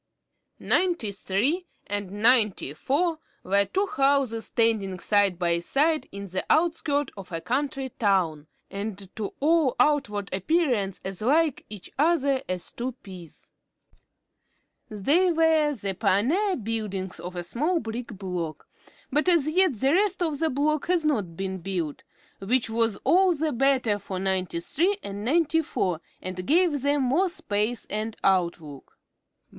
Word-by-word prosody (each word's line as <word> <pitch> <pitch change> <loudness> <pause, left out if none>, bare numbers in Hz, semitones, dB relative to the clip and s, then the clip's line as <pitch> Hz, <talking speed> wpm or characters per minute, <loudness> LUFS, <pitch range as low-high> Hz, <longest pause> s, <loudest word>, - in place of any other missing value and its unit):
Ninety 345 - +1
three 260 - -1 0.2
and 205 -1 -3
Ninety 210 - +3
four 315 - 0 0.2
were 200 +2 +2
two 385 - 0
houses 275 - +1
standing 220 -5 +1
side 200 -2 +2
by 170 -1 +1
side 300 - +1
in 200 0 -7
the 185 +1 -2
outskirts 310 -3 +1
of 195 -2 -10
a 165 - -3
country 270 - -2
town, 180 -10 0 0.2
and 200 -1 -6
to 210 -3 -5
all 310 -2 +3
outward 210 -10 +1
appearance 215 - 0
as 190 0 -5
like 300 +5 +2
each 210 -3 -10
other 285 -4 +2
as 185 -1 -2
two 250 +2 -4
peas. 185 - -13 1.4
They 290 - +2
were 320 -2 +3
the 200 -4 -4
pioneer 240 - +1
buildings 210 - -4
of 180 +2 -7
a 175 - -4
small 300 - 0
brick 230 0 -5
block; 180 -6 -5 0.4
but 300 +6 +2
as 335 -5 +4
yet 350 -2 +3
the 265 +7 +1
rest 380 -1 +2
of 310 -4 -2
the 320 - +1
block 300 +2 0
had 350 -3 +1
not 205 - -1
been 190 -1 -3
built, 170 -5 -4 0.4
which 230 +3 0
was 225 -2 +1
all 370 0 +4
the 310 +1 -1
better 250 -5 +2
for 190 -1 -6
Ninety 185 -2 -1
three 360 - +1
and 200 +1 -6
Ninety 325 +5 +2
four, 180 - -2 0.2
and 185 0 -5
gave 325 -3 +3
them 285 0 +1
more 320 +10 +2
space 220 - -2
and 215 +1 -4
outlook. 170 -7 -1
230 Hz, 145 wpm, -26 LUFS, 195-305 Hz, 1.4 s, as